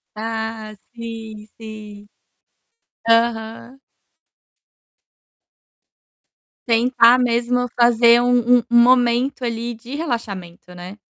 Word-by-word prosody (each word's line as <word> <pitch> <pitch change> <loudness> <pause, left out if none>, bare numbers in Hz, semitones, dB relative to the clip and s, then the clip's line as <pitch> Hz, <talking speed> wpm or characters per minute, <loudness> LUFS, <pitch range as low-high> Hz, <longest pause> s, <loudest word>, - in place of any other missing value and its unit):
Ah, 220 0 -6 0.2
sim, 225 -2 -9
sim. 210 -2 -12 1.0
Aham. 230 +2 -1 2.9
Tentar 235 +1 +4
mesmo 245 0 -1
fazer 235 0 +3
um 245 0 +3
um 240 - +4
momento 245 +1 +2
ali 235 0 -4
de 235 +4 -11
relaxamento, 200 - -6
né. 180 +3 -11
230 Hz, 75 wpm, -19 LUFS, 220-245 Hz, 2.9 s, Tentar